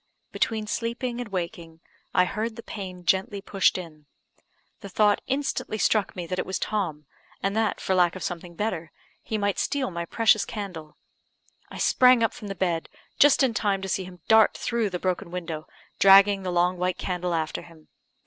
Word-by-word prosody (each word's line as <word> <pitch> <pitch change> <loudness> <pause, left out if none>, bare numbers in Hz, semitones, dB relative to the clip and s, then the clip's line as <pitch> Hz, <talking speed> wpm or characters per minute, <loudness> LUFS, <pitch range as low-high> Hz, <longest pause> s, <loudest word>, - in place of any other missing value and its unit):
Between 220 -2 -1
sleeping 235 +3 -3
and 240 - -7
waking, 170 -3 -5 0.3
I 180 - +4
heard 220 +4 -3
the 230 - -9
pane 185 -4 -8
gently 190 +3 +1
pushed 195 -1 +1
in. 155 -5 -10 0.7
The 200 - -9
thought 205 +1 +3
instantly 270 -5 -2
struck 215 -2 +1
me 180 - -4
that 185 +2 -3
it - - -1
was 190 - -2
Tom, 170 -8 -2 0.4
and 195 +1 0
that, 220 -1 0
for 190 - -1
lack 180 -1 +3
of 185 - -6
something 175 -1 -5
better, 175 -5 -3 0.3
he 220 - -3
might 205 -1 0
steal 275 -5 -1
my 170 0 -4
precious 220 +3 +3
candle. 180 -8 -7 0.7
I - - -9
sprang 250 -2 +5
up 225 - +1
from 210 - -9
the 195 - -5
bed, 175 -3 -1 0.3
just 290 -1 +6
in 255 -3 +2
time 200 -2 0
to - - -3
see 190 0 -1
him 180 -1 -12
dart 220 -1 +5
through 230 -3 -1
the 180 - -3
broken 180 -1 -2
window, 165 -3 -5 0.3
dragging 195 0 +7
the 185 - -4
long 175 +1 +2
white 180 0 0
candle 180 -1 -2
after 160 -1 -2
him. 160 -2 -17
190 Hz, 185 wpm, -26 LUFS, 175-215 Hz, 0.7 s, dragging